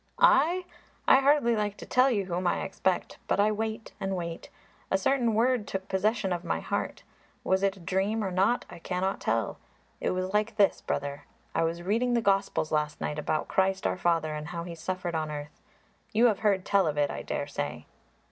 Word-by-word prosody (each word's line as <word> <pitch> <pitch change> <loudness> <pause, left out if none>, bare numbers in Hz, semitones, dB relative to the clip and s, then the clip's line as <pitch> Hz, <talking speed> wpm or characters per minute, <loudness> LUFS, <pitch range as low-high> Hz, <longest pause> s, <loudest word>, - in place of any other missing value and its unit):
"I? 360 - +4 0.4
I - - +8
hardly 275 -4 +4
like 210 -1 -1
to - - -9
tell 255 +2 +4
you 205 -6 0
whom 180 0 -1
I - - +1
expect. 190 -1 -1
But - - +1
I 210 +1 +4
wait 220 +1 -4
and 195 0 -2
wait. 170 -2 -5 0.4
A 195 - +3
certain 235 +2 +1
word 235 -1 +2
took 190 0 -4
possession 200 0 +1
of 175 0 -4
my - - -1
heart. - - -3 0.4
Was 190 0 +2
it 195 0 +1
a - - -14
dream 195 +5 0
or 190 - -2
not, 195 +7 +2
I - - -11
cannot 185 +3 -2
tell. 115 0 -1 0.4
It - - 0
was 185 +1 -2
like 215 +1 +1
this, 205 -2 +3
brother; 140 0 -3 0.3
I - - +1
was 170 +1 -3
reading 235 +6 +1
the 235 - +2
Gospels 195 -5 +1
last 150 -1 0
night 150 - -3
about 155 +1 -1
Christ 190 0 +1
our - - +1
Father 165 -3 +1
and 150 0 -5
how 170 0 -4
He 170 0 -7
suffered 175 +1 -4
on 155 -1 -1
earth. 150 0 -7 0.5
You 225 +3 +5
have 215 -5 +3
heard 200 -3 +2
tell 195 -3 +3
of 150 -1 -1
it, 145 -1 +2
I - - -5
daresay." - - -4
190 Hz, 205 wpm, -28 LUFS, 170-215 Hz, 0.5 s, I